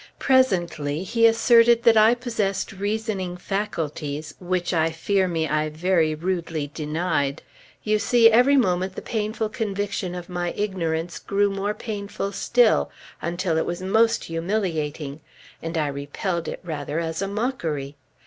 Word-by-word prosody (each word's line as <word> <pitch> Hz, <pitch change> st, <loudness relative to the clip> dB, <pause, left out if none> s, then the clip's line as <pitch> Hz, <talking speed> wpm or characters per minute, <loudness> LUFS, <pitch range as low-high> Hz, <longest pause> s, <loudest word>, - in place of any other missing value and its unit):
Presently 175 Hz, -, +1 dB
he 230 Hz, +4 st, +4 dB
asserted 230 Hz, +1 st, +5 dB
that 230 Hz, -2 st, +6 dB
I 220 Hz, +2 st, +6 dB
possessed 225 Hz, -6 st, -2 dB
reasoning 200 Hz, -2 st, -3 dB
faculties, 155 Hz, -6 st, -3 dB
which 180 Hz, 0 st, -1 dB
I 160 Hz, -1 st, +2 dB
fear 185 Hz, +4 st, 0 dB
me 165 Hz, -2 st, -1 dB
I 155 Hz, 0 st, 0 dB
very 160 Hz, 0 st, +1 dB
rudely 165 Hz, -3 st, -3 dB
denied. 150 Hz, -2 st, -1 dB, 0.4 s
You 215 Hz, 0 st, +2 dB
see, 235 Hz, +1 st, +5 dB
every 250 Hz, +5 st, +5 dB
moment 185 Hz, -5 st, +1 dB
the -, -, -6 dB
painful 220 Hz, 0 st, -2 dB
conviction 200 Hz, -4 st, -3 dB
of 175 Hz, -1 st, -7 dB
my 175 Hz, -1 st, -3 dB
ignorance 175 Hz, -5 st, -2 dB
grew 200 Hz, 0 st, +1 dB
more 200 Hz, +2 st, -2 dB
painful 200 Hz, -2 st, -4 dB
still, 230 Hz, -, +3 dB, 0.3 s
until 170 Hz, -1 st, -1 dB
it -, -, 0 dB
was 175 Hz, +2 st, -4 dB
most 225 Hz, +4 st, +3 dB
humiliating; 165 Hz, -5 st, -3 dB, 0.4 s
and 165 Hz, +1 st, -4 dB
I 155 Hz, -, +1 dB
repelled 145 Hz, +5 st, -3 dB
it -, -, -5 dB
rather 155 Hz, -2 st, -3 dB
as 165 Hz, +1 st, -3 dB
a 195 Hz, -, -1 dB
mockery. 170 Hz, -, -3 dB
185 Hz, 140 wpm, -24 LUFS, 160-210 Hz, 0.4 s, that